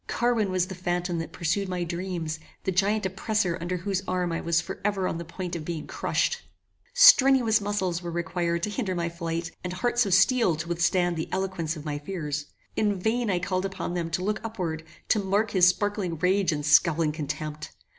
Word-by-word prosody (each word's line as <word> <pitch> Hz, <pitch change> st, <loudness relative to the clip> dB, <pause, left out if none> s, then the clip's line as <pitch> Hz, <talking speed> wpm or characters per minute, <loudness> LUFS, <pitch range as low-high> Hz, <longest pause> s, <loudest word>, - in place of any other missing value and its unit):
Carwin 235 Hz, -4 st, +1 dB
was 185 Hz, -1 st, +1 dB
the 190 Hz, -, -7 dB
phantom 175 Hz, -1 st, -2 dB
that 165 Hz, -, -5 dB
pursued 185 Hz, +4 st, -1 dB
my 180 Hz, -1 st, -2 dB
dreams, 170 Hz, -2 st, -4 dB, 0.2 s
the 190 Hz, -, 0 dB
giant 205 Hz, +3 st, +1 dB
oppressor 190 Hz, -1 st, 0 dB
under 180 Hz, +2 st, -2 dB
whose 190 Hz, +1 st, -2 dB
arm 180 Hz, -1 st, 0 dB
I 165 Hz, -, -2 dB
was 170 Hz, -1 st, +2 dB
for -, -, -6 dB
ever 200 Hz, -2 st, 0 dB
on 165 Hz, -, -3 dB
the -, -, -4 dB
point 175 Hz, +1 st, -5 dB
of 165 Hz, -, -4 dB
being 160 Hz, -1 st, -4 dB
crushed. -, -, -1 dB, 0.5 s
Strenuous 270 Hz, -, +7 dB
muscles 190 Hz, -4 st, -1 dB
were 175 Hz, -, -5 dB
required 170 Hz, 0 st, -1 dB
to 210 Hz, -, -1 dB
hinder 205 Hz, -5 st, -2 dB
my 170 Hz, -1 st, -1 dB
flight, 165 Hz, 0 st, -4 dB
and 180 Hz, -, -3 dB
hearts 240 Hz, +4 st, +1 dB
of 190 Hz, -, +4 dB
steel 195 Hz, -2 st, +4 dB
to 160 Hz, +2 st, -5 dB
withstand 175 Hz, 0 st, +1 dB
the 160 Hz, -, -3 dB
eloquence 185 Hz, -4 st, -2 dB
of 150 Hz, -, -9 dB
my 145 Hz, -1 st, -3 dB
fears. 150 Hz, -3 st, -4 dB, 0.3 s
In 205 Hz, -3 st, +1 dB
vain 225 Hz, +4 st, 0 dB
I 185 Hz, -, +2 dB
called 185 Hz, +1 st, -1 dB
upon 190 Hz, -2 st, -4 dB
them 170 Hz, -2 st, -2 dB
to 170 Hz, +2 st, -2 dB
look 210 Hz, +2 st, -1 dB
upward, 180 Hz, -8 st, -4 dB, 0.3 s
to 215 Hz, -, +4 dB
mark 200 Hz, +2 st, 0 dB
his 180 Hz, -2 st, +5 dB
sparkling 185 Hz, -2 st, 0 dB
rage 185 Hz, +2 st, +2 dB
and 145 Hz, -1 st, -2 dB
scowling 155 Hz, +1 st, +4 dB
contempt. 150 Hz, 0 st, -5 dB
180 Hz, 200 wpm, -26 LUFS, 170-200 Hz, 0.5 s, Strenuous